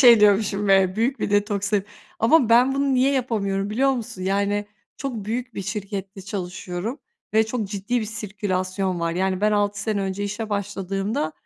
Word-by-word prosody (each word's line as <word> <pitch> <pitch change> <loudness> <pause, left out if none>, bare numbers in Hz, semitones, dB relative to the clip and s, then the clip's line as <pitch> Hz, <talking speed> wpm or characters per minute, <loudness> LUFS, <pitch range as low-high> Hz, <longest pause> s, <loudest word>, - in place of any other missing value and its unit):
şey 235 -4 +8
diyormuşum 205 0 +3
ve 195 0 +4
büyük 250 +5 +1
bir - - -1
detoksin 205 -1 +1 0.3
Ama 240 +1 +4
ben 250 +3 +5
bunu 275 -1 +1
niye 265 +2 +3
yapamıyorum 205 -6 -1
biliyor 270 +5 +3
musun? 220 -6 -5
Yani, 200 +2 +1 0.3
çok 270 -3 -4
büyük 240 +2 -3
bir 195 - -4
şirkette 195 -1 -5
çalışıyorum 190 - -4 0.4
ve 220 0 +4
çok 225 -1 -2
ciddi 205 +5 -1
bir - - -2
sirkülasyon 190 -3 -2
var. 165 0 0
Yani, 185 +1 0
ben 210 +1 +3
6 205 0 +1
sene 210 -1 -1
önce 195 +1 -2
işe 210 +2 -4
başladığımda, 195 -3 -2
205 Hz, 170 wpm, -23 LUFS, 195-225 Hz, 0.4 s, şey